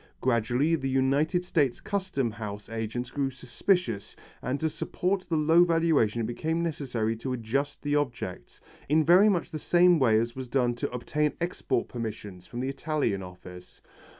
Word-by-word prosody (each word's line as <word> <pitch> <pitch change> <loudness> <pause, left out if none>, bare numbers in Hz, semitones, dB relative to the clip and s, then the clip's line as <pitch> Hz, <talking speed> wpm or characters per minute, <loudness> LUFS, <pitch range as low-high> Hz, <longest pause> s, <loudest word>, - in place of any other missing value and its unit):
Gradually 125 +5 +1
the 135 -5 0
United 140 +7 +2
States 150 -8 +1
Custom 185 - -2
House 105 -2 -7
agents 115 +2 -4
grew 140 -2 -1
suspicious, 130 - -1 0.3
and 130 +3 -2
to 160 - +1
support 185 +4 -2
the 165 - +1
low 160 +3 +5
valuation 165 -10 +2
it - - -1
became 160 +8 -2
necessary 125 -9 -2
to 130 +3 -3
adjust 135 +5 -2
the 145 0 0
objects, 120 -10 -3 0.3
in 155 +1 +4
very 185 +5 +7
much 180 -5 0
the 155 - -4
same 175 +1 +4
way 110 -5 +4
as 115 +1 -2
was 130 -1 -6
done 120 -1 +1
to 120 - -3
obtain 150 +5 -1
export 175 -8 -1
permission, 105 -5 -6
from 120 +7 -7
the 130 - -1
Italian 140 -8 -1
office. 90 -1 -11
135 Hz, 165 wpm, -28 LUFS, 115-160 Hz, 0.3 s, very